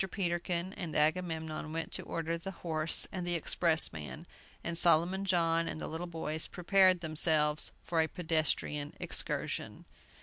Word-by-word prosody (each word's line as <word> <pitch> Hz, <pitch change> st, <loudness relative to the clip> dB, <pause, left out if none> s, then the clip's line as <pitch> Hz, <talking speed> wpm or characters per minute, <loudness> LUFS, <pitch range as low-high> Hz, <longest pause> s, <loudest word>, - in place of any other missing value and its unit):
Peterkin 175 Hz, 0 st, -2 dB
and 165 Hz, -5 st, -6 dB
Agamemnon 160 Hz, -1 st, -1 dB
went 165 Hz, +1 st, -4 dB
to -, -, +1 dB
order 165 Hz, 0 st, -3 dB
the 170 Hz, +3 st, -6 dB, 0.2 s
horse 160 Hz, -1 st, +3 dB
and 180 Hz, -3 st, -4 dB
the 175 Hz, -, 0 dB
expressman, 160 Hz, -, +2 dB, 0.4 s
and 170 Hz, -, -3 dB
Solomon 175 Hz, +3 st, +2 dB
John 165 Hz, -3 st, +2 dB
and 155 Hz, -, -5 dB
the -, -, -4 dB
little 165 Hz, +3 st, -5 dB
boys 160 Hz, -2 st, -4 dB
prepared 185 Hz, 0 st, +3 dB
themselves 155 Hz, -1 st, +2 dB
for 165 Hz, -2 st, +1 dB
a 160 Hz, -, +1 dB
pedestrian 155 Hz, -3 st, -1 dB
excursion. -, -, -2 dB
165 Hz, 140 wpm, -32 LUFS, 155-175 Hz, 0.4 s, horse